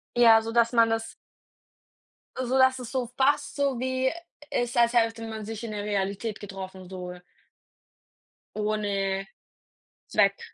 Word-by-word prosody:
Ja, 230 -2 +7
sodass 230 +1 +2
man 230 -1 +5
das 225 0 -2 1.2
sodass 260 +1 +3
es 245 -2 -7
so 255 -3 -2
fast 285 +2 +2
so 280 -4 0
wie 260 +1 0 0.4
ist 245 -1 -1
als 235 0 +4
hätte 225 -1 +1
man 220 -1 -6
sich 225 +1 -6
in 230 - -4
der 205 -1 -4
Realität 205 +1 -2
getroffen 190 -2 -8
so. 180 -1 -6 1.4
Ohne 200 -2 -1 0.8
Zweck. 200 -1 +2
225 Hz, 125 wpm, -27 LUFS, 205-245 Hz, 1.4 s, Ja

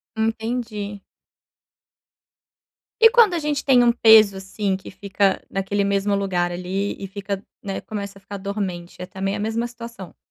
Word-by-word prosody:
Entendi. 220 -2 -3 2.0
E 455 - +9
quando 460 -5 +5
a 340 - 0
gente 295 -2 -2
tem 255 -3 +5
um 240 - +5
peso, 220 -4 +6
assim, 195 0 -2
que 190 - -11
fica 195 0 0
naquele 195 +1 -1
mesmo 200 0 +1
lugar 180 -3 0
ali 185 +3 -3
e 195 - -6
fica, 195 0 -5 0.2
né, 195 -1 -4
começa 200 -2 -6
a - - -28
ficar 200 +1 -7
dormente, 190 -3 -5
é - - -4
também 195 +2 -3
a - - -4
mesma 225 +3 -1
situação? 230 -5 -10
200 Hz, 155 wpm, -22 LUFS, 195-225 Hz, 2.0 s, E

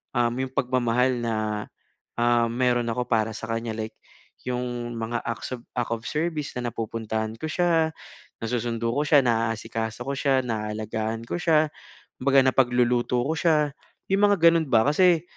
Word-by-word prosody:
um, 120 -1 +2
'yong 130 0 -3
pagmamahal 125 -1 +1
na, 115 -1 -1 0.8
ah, 120 0 +3
meron 120 0 +1
ako 125 +2 -2
para 110 -1 +1
sa 115 - -6
kanya. 115 0 -2
Like 110 0 -5 0.5
'yong 120 -1 -3
mga 115 +1 -2
acts 115 +2 -4
of 120 - -16 0.2
of 115 -1 -1
service 155 -1 -2
na 120 -1 -2
napupuntahan 110 0 -3
ko, - - -3
siya 165 -2 +2 0.5
nasusundo 115 0 -1
ko 145 - +1
siya, 145 -1 +6
naasikaso 115 -1 -1
ko - - -2
siya, 135 -1 +2
naalagaan 110 0 -3
ko - - -2
siya, 155 -2 +3 0.5
kumbaga 135 0 +5
napagluluto 125 -1 +2
ko 155 - 0
siya. 150 -2 +2 0.4
'Yong 195 +1 +3
mga 205 0 +4
gano'n 165 -2 +1
ba. 110 -2 +5
Kasi 170 +2 +4
120 Hz, 150 wpm, -25 LUFS, 115-140 Hz, 0.8 s, siya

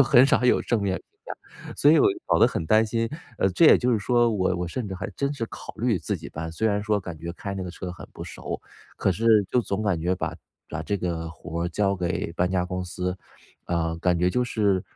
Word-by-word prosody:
就 - - +10
很 130 -1 +6
少 130 - +2
有 125 - +4
正 115 -4 0
面 95 -2 0
评 - - -10
价。 - - -47 0.6
所 145 - +5
以 160 - +6
我 - - +6
就 350 - -9
搞 - - +3
得 - - +7
很 100 - -2
担 110 +5 +5
心， 115 +1 -1 0.3
呃 95 - +3
这 95 - +3
也 - - +9
就 125 - +1
是 110 - +2
说 120 +4 +3
我 95 -3 +1
我 90 -1 -3
甚 115 +5 -4
至 95 - -5
还 90 - -5
真 140 0 0
是 135 -5 -3
考 - - -9
虑 115 -4 +1
自 80 - -2
己 - - -9
搬。 80 +1 -5
虽 110 +7 0
然 105 0 0
说 105 -1 +1
感 85 -4 -7
觉 85 +1 -5
开 100 +3 -6
那 95 - -4
个 90 - -5
车 90 +1 -6
很 90 - -9
不 - - -8
熟， - - -6 0.4
可 - - +1
是 110 +2 +4
就 125 - +3
总 105 -2 -2
感 100 -6 0
觉 90 +3 +1
把 - - -3 0.3
把 - - -4
这 100 - -1
个 85 -3 -3
活 85 +1 -4
交 100 +2 0
给 90 -1 -2
搬 90 +2 0
家 90 -1 +1
公 90 0 -3
司， 90 +1 -3 0.5
啊， 85 -1 -1
感 90 -1 +2
觉 90 - +3
就 125 +4 +1
是， 100 -6 +1
95 Hz, 275 characters per minute, -25 LUFS, 90-115 Hz, 0.6 s, 就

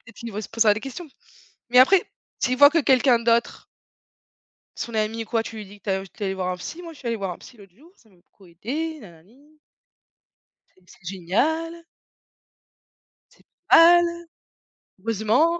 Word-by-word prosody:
peut-être 225 - -18
qu'ils 235 - -8
devraient 215 -1 -5
se - - -9
posera 225 -2 +3
des 215 - -5
questions. 275 +5 -8 0.6
Mais 250 - +4
après, 350 +9 +6 0.4
s'ils 255 +1 0
voient 285 +1 +8
que 335 - +2
quelqu'un 260 -2 +3
d'autre 235 0 0 1.1
son 235 - -6
ami, 220 +1 -2
quoi, 225 0 -1
tu 225 0 -9
lui 210 -2 -8
dis 205 +1 -15
que - - -51
tu 205 - -3
es 190 0 -2
tu 210 - -10
es - - 0
allé 190 - -2
voir 185 -1 -3
un 180 - -3
psy: 320 - -8
«Moi 335 - -9
je - - -18
suis 245 - -7
allé 230 - -1
voir 195 -3 -4
un 175 - -8
psy 245 - -15
l'autre 195 -3 -17
jour, 315 +8 -20
ça 225 - -27
m'a 190 - -26
beaucoup 190 +2 -24
aidé, 285 - -5
nanani» 220 - -18 1.2
«c'est 185 - -29
c'est 240 -3 -20
génial» 230 - -1 1.6
«c'est - - -26 0.3
pas 345 +1 +8
mal! 340 0 -4 0.8
Heureusement!» 230 - +1
230 Hz, 190 wpm, -23 LUFS, 200-290 Hz, 1.6 s, voient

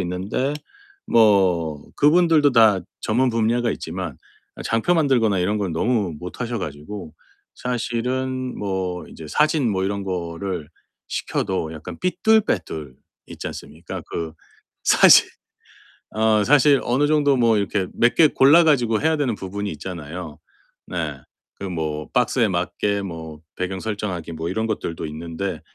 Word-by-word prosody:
있는데 95 +10 -2 0.5
뭐 90 -9 +3
그분들도 155 -2 +4
다 110 -5 +6 0.2
전문 125 +4 +1
분야가 115 +1 +1
있지만 - - -5 0.5
장표 115 +11 +1
만들거나 120 - +2
이런 105 +4 0
건 95 -4 -2
너무 100 0 0
못 90 +8 -9
하셔 120 -1 -2
가지고 80 +2 -7 0.4
사실은 125 +2 -2
뭐 95 -3 -3
이제 80 - -10
사진 150 - +2
뭐 95 -1 -1
이런 100 0 -2
거를 90 -2 -4 0.4
시켜도 85 -4 -2
약간 80 - -9
삐뚤빼뚤 180 - +1 0.3
있지 - - -8
않습니까. - - -8
그 80 -1 -4 0.5
사진 - - +7 0.8
어 110 -1 +2
사실 145 +1 +5
어느 135 +5 +2
정도 145 -2 +3
뭐 115 -3 +3
이렇게 100 -1 -1
몇 115 +1 +2
개 160 - +6
골라 145 +5 +6
가지고 120 -8 +2
해야 160 +1 +2
되는 130 -6 0
부분이 100 +1 -5
있잖아요. 80 -1 -7 0.5
네. 80 -6 -4 0.4
그 - - -7
뭐 75 -3 -3
박스에 125 -2 +2
맞게 95 +3 -1
뭐 80 -4 -7 0.2
배경 95 +1 -3
설정하기 100 -6 -4
뭐 80 +1 -4
이런 110 +4 -1
것들도 85 -7 -3
있는데 85 +5 -5
100 Hz, 275 characters per minute, -22 LUFS, 85-125 Hz, 0.8 s, 사진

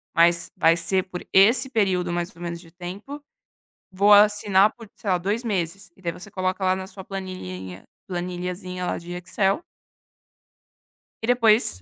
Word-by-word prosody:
mas 170 0 +3
vai 165 -2 +5
ser 180 +3 0
por 180 -2 -8
esse 225 +7 +5
período 190 -7 +1
mais 175 0 -3
ou 175 - -14
menos 170 -1 -4
de 165 -1 -16
tempo. 195 - -8 0.7
Vou 200 +2 +4
assinar 205 -1 +5
por, 225 -3 -13
sei 200 - -3
lá, 180 - +3
2 205 +7 -2
meses, 195 -3 -3
e - - -21
daí 175 -2 -2
você 195 +4 -11
coloca 185 0 -2
lá 185 0 +3
na 190 0 -5
sua 190 -1 -11
planilhinha 95 - -7 0.2
planilhazinha 180 0 -4
lá - - -1
de 175 +1 -9
Excel 190 - 0 1.6
E - - -1
depois, 230 - +3
185 Hz, 165 wpm, -24 LUFS, 175-205 Hz, 1.6 s, vai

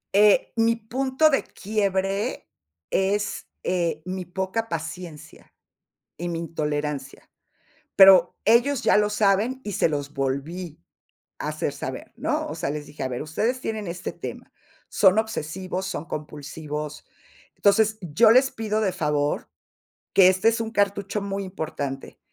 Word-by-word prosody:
Eh, 210 +4 +5
mi 230 0 +3
punto 260 +6 +1
de 275 - +2
quiebre 200 - -2 0.4
es, 205 +2 0 0.2
eh, 170 -3 -1
mi 185 0 -4
poca 190 +6 -3
paciencia 165 -1 -7 0.6
y 175 - -4
mi 170 -1 -2
intolerancia. 150 -4 -4 0.7
Pero, 190 -3 +8
ellos 240 +4 +4
ya - - +4
lo 210 0 +3
saben, 210 +5 +1
y 205 - -4
se 170 - +2
los 145 -1 -3
volví 140 - -4 0.6
a - - -2
hacer - - -2
saber, - - -6
¿no? - - -1
O - - -5
sea, - - -2
les 150 0 -4
dije, 145 -1 -7
a 130 - -2
ver, 125 -1 -4
ustedes 220 - -1
tienen 220 -5 -4
este 175 +1 -5
tema. - - -8 0.4
Son 195 +1 +4
obsesivos, 190 -3 -3
son 165 - -4
compulsivos. 150 0 -6 0.5
Entonces, 215 +1 +3
yo 190 +7 +4
les 260 +3 +5
pido 215 -1 -2
de 200 -3 +1
favor, 150 -4 -1 0.6
que 190 -2 +7
este 185 +3 +2
es 230 +1 +3
un 225 - -4
cartucho 200 -1 0
muy 200 0 -3
importante. 150 -7 -5
190 Hz, 140 wpm, -24 LUFS, 155-215 Hz, 0.7 s, Pero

